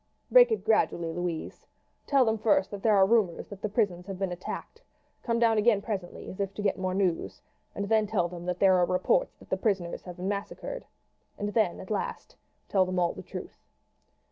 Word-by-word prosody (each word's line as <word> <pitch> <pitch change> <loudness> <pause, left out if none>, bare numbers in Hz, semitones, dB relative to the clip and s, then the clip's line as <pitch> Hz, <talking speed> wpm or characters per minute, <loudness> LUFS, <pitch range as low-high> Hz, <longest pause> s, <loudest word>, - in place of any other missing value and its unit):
"Break - - +8
it 445 - -1
gradually, 170 -6 +2
Louise. 175 -1 -4 0.4
Tell 275 -3 +4
them 220 -1 +1
first 205 -3 +2
that 200 -1 -6
there 215 -1 +4
are 195 -1 +6
rumours 200 -5 +1
that 200 -1 -10
the 215 - -2
prisons 200 -4 0
have 195 -2 -5
been 190 -1 -2
attacked. 180 - -7 0.4
Come 230 -1 0
down 230 -2 +3
again 215 -1 +4
presently 200 -4 -5
as 185 - -8
if 195 -1 -2
to 205 - -4
get 195 -1 +1
more 185 0 -1
news, 185 -4 -1 0.4
and 200 - -3
then 215 0 +3
tell 195 -5 +1
them 175 0 -8
that 180 0 -1
there 190 0 +5
are 180 - +4
reports - - +1
that - - -18
the - - +1
prisoners 190 -6 -1
have 180 -1 -8
been 180 +1 -4
massacred, 205 - -4 0.5
and 205 - -2
then 215 -7 +1
at 190 - -9
last 205 - -3 0.3
tell 190 -2 +3
them 185 0 -3
all 175 -1 +2
the - - -8
truth." - - -9
200 Hz, 210 wpm, -28 LUFS, 180-220 Hz, 0.5 s, Break